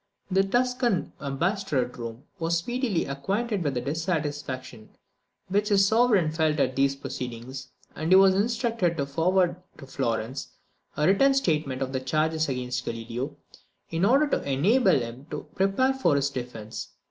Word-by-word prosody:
The 190 +1 +4
Tuscan 245 -1 0
ambassador 155 - 0
at 125 - -12
Rome 115 +1 -7 0.2
was 165 +1 +1
speedily 235 -1 -1
acquainted 195 +9 -2
with 140 -3 -1
the 125 - -1
dissatisfaction 145 - -3 0.6
which 205 +3 +1
his 195 -1 +5
Sovereign 220 -7 +3
felt 155 -1 +1
at 130 -2 +1
these 135 0 +2
proceedings; 130 0 -6 0.3
and 160 +3 -2
he - - +9
was 190 0 +7
instructed 225 -4 0
to 140 - 0
forward 175 +4 +1 0.2
to 140 - -10
Florence 130 -1 -2 0.5
a 150 - +2
written 270 - +4
statement 150 - 0
of 130 0 -5
the 130 - 0
charges 155 +4 0
against 125 -1 -2
Galileo, 120 +5 -5 0.5
in 165 +2 -1
order 270 +9 +5
to - - +1
enable 180 - +3
him 120 +4 -7
to - - -5
prepare 195 +8 +2
for 175 - +2
his 140 0 +1
defence. 120 -4 -6
155 Hz, 155 wpm, -26 LUFS, 130-195 Hz, 0.6 s, he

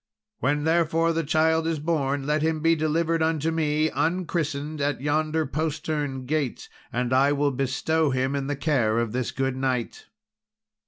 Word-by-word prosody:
When, 145 +3 +1
therefore, 165 0 +2
the 165 0 0
child 160 +2 +2
is 165 -1 0
born, 145 -3 -1
let 150 +1 +1
him 160 0 0
be 165 +1 +4
delivered 160 +1 0
unto 160 0 +1
me, 155 -1 +1
unchristened, 155 -4 -1
at 145 -1 0
yonder 155 +3 0
postern 150 -2 -2
gate, 145 -2 -2 0.2
and 125 +1 -1
I 135 +2 +4
will 145 0 +1
bestow 140 +4 0
him 130 +1 0
in 135 -1 -2
the 145 - -1
care 130 -6 +1
of 115 -2 0
this 125 0 -2
good 135 -1 -1
knight." 130 -3 -2
150 Hz, 160 wpm, -25 LUFS, 135-160 Hz, 0.2 s, be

